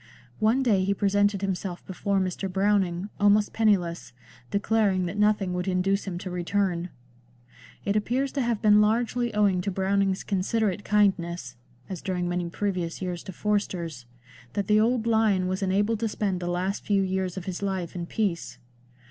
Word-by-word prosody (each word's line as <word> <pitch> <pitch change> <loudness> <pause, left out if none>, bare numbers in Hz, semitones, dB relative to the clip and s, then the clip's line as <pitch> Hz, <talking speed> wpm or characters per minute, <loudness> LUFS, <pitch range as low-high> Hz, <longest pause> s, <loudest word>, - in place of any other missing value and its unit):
One 230 +5 +3
day 205 -7 +3
he 200 +1 +1
presented 205 0 +2
himself 185 -2 -3
before 195 +1 -1
Mr. 185 +1 -2
Browning, 195 -1 +1
almost 205 0 +4
penniless, 185 - +1 0.4
declaring 200 -2 +1
that 175 - -4
nothing 210 -3 +2
would 180 +1 -2
induce 190 +2 +1
him 185 -3 -4
to 185 0 -6
return. 180 0 -1 1.0
It 200 - 0
appears 250 +6 0
to 280 - -1
have 235 -2 -1
been 210 0 +6
largely 235 +2 +1
owing 200 -3 +3
to 200 - -2
Browning's 195 0 0
considerate 205 +1 0
kindness 175 -10 +1 0.3
(as 185 -4 -6
during 180 -2 -2
many 175 -1 -2
previous 180 -3 -2
years 180 -2 -4
to - - -6
Forster's) 175 - -2 0.5
that 200 - -1
the 210 +2 +4
old 230 +1 +2
lion 220 -5 +3
was 185 +1 -2
enabled 205 +3 +1
to 230 - 0
spend 200 -3 -1
the 175 - -4
last 180 +3 -2
few 200 -2 +2
years 190 -1 -2
of 185 - -5
his 185 0 -4
life 190 -4 -2
in 175 -1 -5
peace. 190 -6 -2
195 Hz, 165 wpm, -26 LUFS, 180-210 Hz, 1.0 s, been